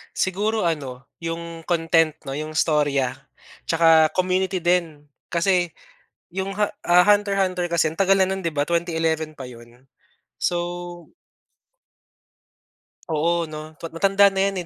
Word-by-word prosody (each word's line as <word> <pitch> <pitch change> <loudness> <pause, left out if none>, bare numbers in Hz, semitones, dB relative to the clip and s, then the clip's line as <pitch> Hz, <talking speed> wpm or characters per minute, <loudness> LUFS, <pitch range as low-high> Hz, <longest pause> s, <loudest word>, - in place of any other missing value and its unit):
Siguro, 210 +4 0
ano, 135 -6 -3
yung 165 0 -6
content, 165 -2 +2
'no, 135 - -5
yung 155 +1 -5
istorya, 145 -5 +1 0.5
tsaka 165 -1 +5
community 185 +1 0
din. 170 -4 0 0.2
Kasi 175 0 +1 0.7
yung 190 +1 -2
ha 210 - +3 0.2
ah, 180 +1 +5
Hunter 205 -1 +3
hunter 180 -2 0
kasi 165 -2 +2
ang 160 - -12
tagal 195 0 +4
na 190 - +4
nun, 190 0 -3
'di 165 - -1
ba, 145 -1 -1
2011 165 -2 -1
pa 130 - -7
yun. 120 +1 -15 0.5
So 175 0 -3 2.0
Oo, 165 +2 +1
'no. 155 0 -9
Pa - - -9
matanda 195 +3 +4
na 195 +1 +2
'yan, 185 -3 -5
170 Hz, 135 wpm, -23 LUFS, 155-185 Hz, 2.0 s, tsaka